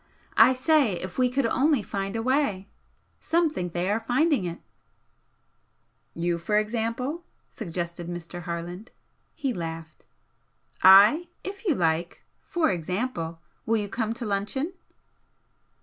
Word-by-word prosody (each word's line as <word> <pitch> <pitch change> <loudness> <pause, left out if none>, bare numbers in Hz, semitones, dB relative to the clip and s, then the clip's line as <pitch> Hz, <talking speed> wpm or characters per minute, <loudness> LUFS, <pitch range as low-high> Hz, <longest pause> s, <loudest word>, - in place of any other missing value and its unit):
I 260 - +8
say 260 - +3
if 180 +4 -5
we 250 -1 +4
could 265 +1 0
only 270 +1 +2
find 195 +1 -4
a 225 - -2
way! 255 -7 0 0.5
Some 335 -1 +1
think 180 - -4
they 175 +1 -1
are 215 - +1
finding 250 - +1
it 170 -1 -5 0.8
" - - -45
"You, 170 0 -1
for 210 +5 0
example?" 230 +8 -2 0.3
suggested 170 -4 -5
Mr. 175 0 -6
Harland. 175 +5 -6 0.5
He 275 -5 -2
laughed. 165 -3 -7 0.7
"I 205 - +8 0.2
if 395 +2 -7
you 320 - +3
like! 170 -1 -1 0.2
for 340 -7 +1
example! 175 -1 -3 0.3
Will 225 0 +3
you 205 -2 -3
come 225 +1 -2
to 235 - -5
luncheon?" 210 - -2
210 Hz, 135 wpm, -26 LUFS, 175-260 Hz, 0.8 s, I